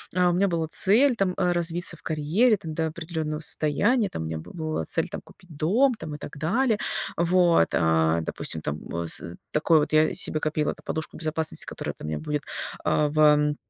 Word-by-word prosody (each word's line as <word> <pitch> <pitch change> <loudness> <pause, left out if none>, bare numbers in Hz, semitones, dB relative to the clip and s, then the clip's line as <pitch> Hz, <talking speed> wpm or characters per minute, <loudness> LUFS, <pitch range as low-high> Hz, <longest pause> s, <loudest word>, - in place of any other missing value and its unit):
а, 180 -1 +4
у - - +1
меня 195 +3 +2
была 165 -3 -1
цель 235 - +4
там 195 -4 0
развиться 175 0 0
в - - -19
карьере 170 +10 +2
там 165 -5 -7
до 160 +1 -1
определенного 160 -1 -4
состояния, 200 - +1
там 80 - -5
у - - -5
меня 80 0 -4
бы 80 - -10
была 155 - -3
цель - - 0
там - - -6
купить 175 -3 -17
дом 220 - +3
там 155 -8 -7
и - - -7
так 150 0 -9
далее. 220 - +1 0.4
Вот, 170 - +3
а, 80 0 +2
допустим, 80 0 -4
там 75 0 -4
в 85 0 -4
с 85 +1 -3 0.2
такой 155 +1 +3
вот 150 - -2
я 155 0 +4
себе 155 - -1
копила 155 0 -1
подушку 160 0 -4
безопасности, 160 0 -1
которая - - -5
там - - -8
меня 75 -1 -3
будет, 145 - -3 0.4
а, 150 -1 +2
в 150 -1 +4
160 Hz, 195 wpm, -25 LUFS, 150-180 Hz, 0.4 s, а